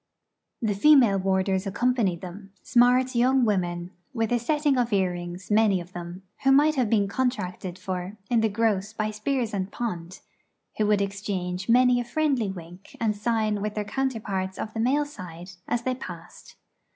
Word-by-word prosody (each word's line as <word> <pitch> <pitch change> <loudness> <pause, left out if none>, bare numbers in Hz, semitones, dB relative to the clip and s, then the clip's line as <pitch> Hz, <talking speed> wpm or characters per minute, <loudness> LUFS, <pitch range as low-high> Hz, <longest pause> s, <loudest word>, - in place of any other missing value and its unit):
The 215 -2 +1
female 235 -3 +5
warders 190 0 0
accompanied 225 -4 0
them; 195 +2 -10
smart 250 +2 +4
young 250 +1 +3
women 175 -4 -1 0.2
with 225 -1 0
a 240 - +2
setting 295 +3 +1
of 245 -2 0
earrings, 180 -1 -2
many 210 -3 +4
of 175 +1 -10
them, 175 +1 -7 0.2
who 270 - +4
might 295 +3 +5
have 255 -6 0
been 205 -3 +2
contracted 200 -6 -2
for 185 +2 -5
in 235 0 +2
the 220 - +2
gross 215 -1 0
by 215 -1 -2
Spiers 230 +1 -2
and 195 -1 -2
Pond; 180 -6 -5 0.6
who 210 - +2
would 205 -1 +3
exchange 195 -1 -4
many 250 +1 +5
a - - -3
friendly 260 -4 0
wink 180 0 -10
and 220 -2 +1
sign 215 -1 0
with 210 0 -3
their 210 -1 -2
counterparts 210 -6 -2
of 215 - -5
the 225 - -4
male 275 +6 +2
side 180 - -10 0.2
as 235 0 -1
they 255 - 0
passed. 255 - -10
210 Hz, 170 wpm, -26 LUFS, 190-245 Hz, 0.6 s, female